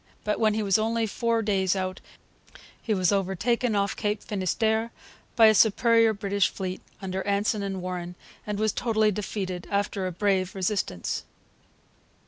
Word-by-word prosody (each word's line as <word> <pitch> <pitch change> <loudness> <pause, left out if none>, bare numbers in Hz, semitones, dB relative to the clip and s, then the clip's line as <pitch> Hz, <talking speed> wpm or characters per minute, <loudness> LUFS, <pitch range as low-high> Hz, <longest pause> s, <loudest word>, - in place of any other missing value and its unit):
But 210 - -1
when 215 -2 +3
he 220 - 0
was 200 +1 +3
only 225 +1 0
four 230 +1 0
days 195 -3 +1
out 185 0 -3 0.8
he 225 - -4
was 185 -4 +2
overtaken 205 +5 0
off 200 0 0
Cape 210 -1 -2
Finisterre 220 +3 0 0.4
by 225 - +7
a 220 - +7
superior 230 +2 +4
British 200 -1 0
fleet, 185 -1 -5 0.2
under 190 0 -3
Anson 205 +2 +1
and 195 -2 -4
Warren, 180 -1 -5 0.3
and 210 -1 -2
was 215 0 +1
totally 220 -2 +1
defeated, 190 -3 -4
after 200 -1 -1
a - - -3
brave 190 0 0
resistance. 190 - -2
205 Hz, 150 wpm, -26 LUFS, 190-220 Hz, 0.8 s, by